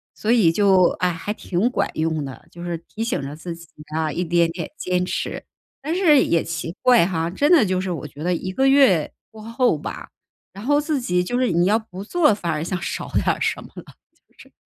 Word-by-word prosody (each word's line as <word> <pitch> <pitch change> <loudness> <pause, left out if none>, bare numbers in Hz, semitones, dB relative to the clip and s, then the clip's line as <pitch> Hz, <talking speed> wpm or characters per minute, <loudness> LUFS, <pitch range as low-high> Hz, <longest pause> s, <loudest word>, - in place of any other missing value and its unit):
所 220 - -1
以 205 -9 +5
就， 190 -1 +4
哎， 180 0 +2
还 170 +5 -4
挺 200 +2 -1
管 255 - -1
用 160 -2 -1
的， 135 -2 -10
就 175 - -10
是 175 -1 -3
提 215 +7 -7
醒 230 - -1
着 140 +1 -6
自 165 +2 -7
己 170 -1 -14 0.3
啊， 160 -1 0
一 175 +5 -2
点 170 0 +2
一 - - -4
点 170 -1 -6
坚 180 -6 -1
持。 - - -4 0.4
但 315 +5 -2
是 310 -8 +5
也 170 - +1
奇 165 +1 -5
怪 245 -8 +5
哈， 165 -2 -1
真 290 - +1
的 305 -11 +6
就 185 -1 0
是 185 0 -3
我 155 -3 -5
觉 145 +2 -10
得 180 - +1
一 185 +2 -3
个 265 +7 +2
月 265 - +4 0.2
过 220 - -12
后 230 - +1
吧， - - -7 0.4
然 200 - -9
后 290 +1 +3
自 300 -2 -1
己 180 -5 0
就 245 +7 -2
是 255 -7 +1
你 170 +1 +2
要 210 +3 +3
不 195 -3 -9
做， 305 +4 +3
反 175 -5 -3
而 150 0 -2
像 180 0 -3
少 - - -4
点 - - +1
儿 - - +1
什 - - 0
么 - - -13
了， - - -9 0.4
就 - - -34
是， - - -16
180 Hz, 260 characters per minute, -22 LUFS, 165-230 Hz, 0.4 s, 的